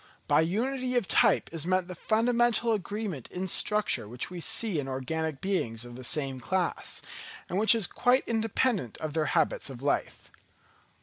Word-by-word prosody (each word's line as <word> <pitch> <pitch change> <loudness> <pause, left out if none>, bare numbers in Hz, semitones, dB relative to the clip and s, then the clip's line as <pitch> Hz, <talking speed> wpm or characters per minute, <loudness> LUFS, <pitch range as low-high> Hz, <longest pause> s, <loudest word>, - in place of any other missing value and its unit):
By - - +5
unity 250 +9 -1
of 240 -6 +1
type - - +4
is 165 0 -2
meant 185 -1 +1
that 180 - -7
fundamental 235 +3 +2
agreement 200 - -4
in 185 +1 -4
structure 205 - 0
which 120 +9 -5
we 180 - -6
see 220 -3 0
in 135 - -3
organic 135 +3 -3
beings 120 - -1
of 120 0 -10
the 130 - -9
same 135 0 -1
class, 180 +8 -2 0.4
and 185 - -1
which 220 +3 +6
is 225 -4 +2
quite 250 +7 +2
independent 225 - 0
of 155 -2 -4
their 155 -1 0
habits 155 -2 +1
of 130 -1 -9
life. 145 - -2
180 Hz, 170 wpm, -29 LUFS, 140-220 Hz, 0.4 s, which